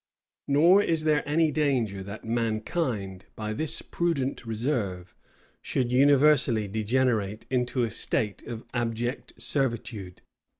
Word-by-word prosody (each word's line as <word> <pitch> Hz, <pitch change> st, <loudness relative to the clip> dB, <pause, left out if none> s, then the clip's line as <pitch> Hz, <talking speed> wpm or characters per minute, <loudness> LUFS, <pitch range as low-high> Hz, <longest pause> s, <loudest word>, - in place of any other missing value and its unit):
Nor 170 Hz, +8 st, +6 dB
is 165 Hz, -5 st, 0 dB
there 155 Hz, -2 st, +3 dB
any 160 Hz, +1 st, +3 dB
danger 130 Hz, -10 st, 0 dB
that 100 Hz, +3 st, -8 dB
mankind, 110 Hz, -, -2 dB
by 110 Hz, 0 st, -4 dB
this 155 Hz, +7 st, -1 dB
prudent 140 Hz, -8 st, -2 dB
reserve, 110 Hz, -6 st, -2 dB, 0.5 s
should 125 Hz, -2 st, -1 dB
universally 135 Hz, -4 st, +4 dB
degenerate 110 Hz, 0 st, 0 dB
into 125 Hz, 0 st, 0 dB
a 115 Hz, -, -1 dB
state 105 Hz, -2 st, -1 dB
of 115 Hz, -1 st, -6 dB
abject 120 Hz, +1 st, -3 dB
servitude. 115 Hz, -8 st, -2 dB
120 Hz, 115 wpm, -27 LUFS, 110-140 Hz, 0.5 s, Nor